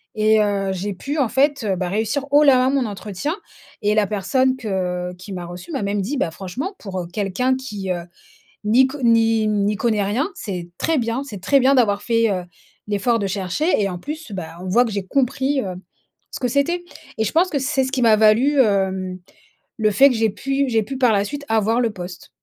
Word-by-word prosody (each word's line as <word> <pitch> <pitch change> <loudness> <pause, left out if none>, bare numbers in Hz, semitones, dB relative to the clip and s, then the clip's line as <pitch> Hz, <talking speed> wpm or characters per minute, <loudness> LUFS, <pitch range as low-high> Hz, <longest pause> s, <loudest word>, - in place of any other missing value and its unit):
et 215 0 +4
heu, 200 -2 0
j'ai 195 +2 -3
pu 280 - -5
en 265 - +3
fait 275 0 +1
bah 180 -1 -2
réussir 220 +8 -1
haut 295 +1 +6
la 275 -3 +6
main 255 +1 +3
mon 270 -3 +1
entretien 205 - -4 0.5
et 210 +1 +1
la 210 -2 +3
personne 255 +6 +1
que 180 -5 -3
qui 185 +2 -9
m'a 175 -1 -5
reçu 175 - -9
m'a 270 - -2
même 200 0 -1
dit: 230 +10 -3
«Bah, 170 -10 0
franchement 245 - -5
pour, 190 -3 -5
heu, 170 - -7
quelqu'un 215 +6 0
qui, 210 -7 -6
heu, 175 -1 -3 0.6
n'y 250 +5 +5
con 285 +2 -8
n'y 225 -2 +3
n'y 210 0 +1
connaît 215 -1 +1
rien, 235 - 0
c'est 180 -5 -5
très 320 -1 +1
bien. 235 +4 -1
C'est 210 -9 -9
très 275 +9 +3
bien 270 +2 +4
d'avoir 205 -5 +2
fait, 230 -1 +2
heu, 180 -2 -2 0.4
l'effort 215 +3 +1
de 200 - -1
chercher 195 - -1
et 195 - +1
en 180 - -5
plus 300 - -7
bah, 170 -2 -6
on 185 - -6
voit 240 +7 +4
que 225 - -4
j'ai 200 -2 -3
compris 270 +4 0
hem, 185 -4 -4 0.5
ce - - -6
que 250 - 0
c'était 340 +7 0 0.3
et 220 - +1
je - - -1
pense 350 +3 +3
que 290 - -1
c'est 265 0 0
ce 260 - -4
qui 265 -2 -1
m'a 225 -2 +6
valu 235 +7 +4
hem, 190 -3 0 0.6
le 215 -2 +2
fait 275 +8 +6
que 250 - -1
j'ai 225 0 +2
pu 275 +5 -1
j'ai 225 -2 +2
pu 270 +6 -6
par 250 -3 +4
la 200 -1 +2
suite 285 +6 -6
avoir 225 +2 +2
le 230 - +1
poste. 180 -2 -9
220 Hz, 225 wpm, -21 LUFS, 195-265 Hz, 0.6 s, haut